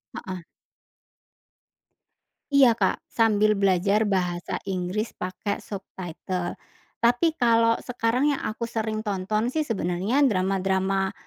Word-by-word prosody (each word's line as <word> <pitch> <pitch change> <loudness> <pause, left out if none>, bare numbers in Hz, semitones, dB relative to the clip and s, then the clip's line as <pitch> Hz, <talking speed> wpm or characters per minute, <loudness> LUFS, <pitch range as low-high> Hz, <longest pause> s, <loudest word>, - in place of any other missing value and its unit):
Heeh. 185 -1 -6 2.1
Iya 270 -4 +6
Kak, 225 - -1
sambil 215 -2 +3
belajar 200 +2 +2
bahasa 180 -3 -1
Inggris 190 +4 -2
pakai 185 +3 -4
subtitle. 185 -2 -5 0.4
Tapi 245 +8 +2
kalau 230 -2 +4
sekarang 245 +1 0
yang 275 - -4
aku 230 +2 -3
sering 220 -1 -3
tonton 215 +4 -1
sih 315 - +1
sebenarnya 200 - -1
drama-drama, 190 -2 +1
205 Hz, 100 wpm, -25 LUFS, 190-230 Hz, 2.1 s, Iya